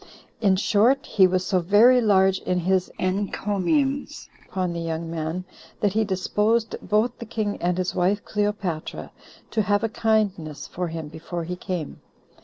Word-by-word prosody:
In 195 -4 +3
short, 225 +7 +3
he 190 -3 +4
was 185 0 0
so 185 -1 +2
very 215 +8 +5
large 190 -3 +4
in 180 -1 -1
his 185 +1 +1
encomiums 205 - -1 0.2
upon 185 -2 -2
the 170 - -4
young 165 0 -4
man, 165 +3 -3 0.3
that 205 -2 +1
he 220 +1 +2
disposed 210 +3 0
both 220 +3 0
the 235 - -6
king 215 -2 -3
and 175 0 0
his 185 0 -1
wife 195 +3 +1
Cleopatra 205 -6 -3 0.4
to 220 - +1
have 205 +1 +1
a 225 - +1
kindness 205 -9 0
for 180 0 -4
him 160 -2 -5
before 165 +2 -6
he 180 +2 -4
came. 180 -4 -5
190 Hz, 160 wpm, -24 LUFS, 180-210 Hz, 0.4 s, very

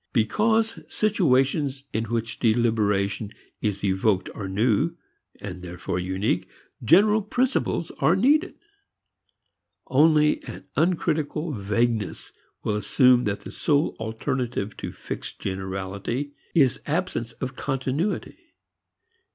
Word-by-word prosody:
Because 220 - +2
situations 140 -8 +1
in 115 +1 0
which 115 -1 -3
deliberation 110 -3 +1 0.3
is 100 -2 -2
evoked 95 0 +1
are 95 -3 -5
new, 105 +2 +1 0.4
and 90 -3 -7
therefore 90 0 -4
unique, 95 0 -1 0.3
general 210 - +5
principles 245 -5 0
are 170 - +4
needed. 295 - +3 1.3
Only 150 +2 +4
an - - -9
uncritical 160 -1 0
vagueness 110 0 -1 0.3
will 105 - 0
assume 125 +4 +4
that 100 -1 -1
the - - -9
sole 150 0 +1
alternative 115 -1 -2
to - - -5
fixed - - -7
generality 95 +8 -4 0.2
is 135 -6 +4
absence 150 -8 -1
of 130 +1 -5
continuity. 140 - -2
120 Hz, 100 wpm, -25 LUFS, 105-155 Hz, 1.3 s, general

